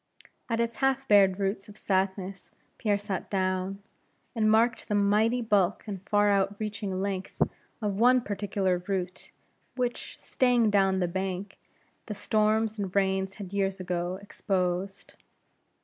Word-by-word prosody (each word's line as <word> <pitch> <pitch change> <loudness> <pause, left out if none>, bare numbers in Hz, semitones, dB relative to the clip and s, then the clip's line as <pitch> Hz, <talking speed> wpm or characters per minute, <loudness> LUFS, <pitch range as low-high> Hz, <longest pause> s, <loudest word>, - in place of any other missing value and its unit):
At 230 -1 0
its 235 0 -1
half 270 0 +1
bared 195 -3 +5
roots 195 +1 -2
of 210 - -13
sadness, 190 -1 -2 0.3
Pierre 205 -2 +1
sat 200 -3 -4
down, 190 0 -1 0.5
and 220 -3 +2
marked 225 +2 +3
the 210 - 0
mighty 215 +4 +2
bulk 205 -4 +2
and 200 -4 -6
far 205 0 +4
out 200 0 +1
reaching 205 -3 -3
length 190 -1 -4 0.4
of 205 -1 -1
one 250 +2 +5
particular 195 -4 -1
root, 185 -2 -3 0.5
which, 250 -2 -3
straying 245 -4 +2
down 195 -2 +3
the 180 - +1
bank, 190 +2 -4 0.5
the 210 - -4
storms 215 +1 +1
and 195 -2 -4
rains 190 -1 +1
had 200 -2 -8
years 195 -1 0
ago 180 0 -2
exposed. 190 -1 -2
200 Hz, 140 wpm, -28 LUFS, 190-215 Hz, 0.5 s, bared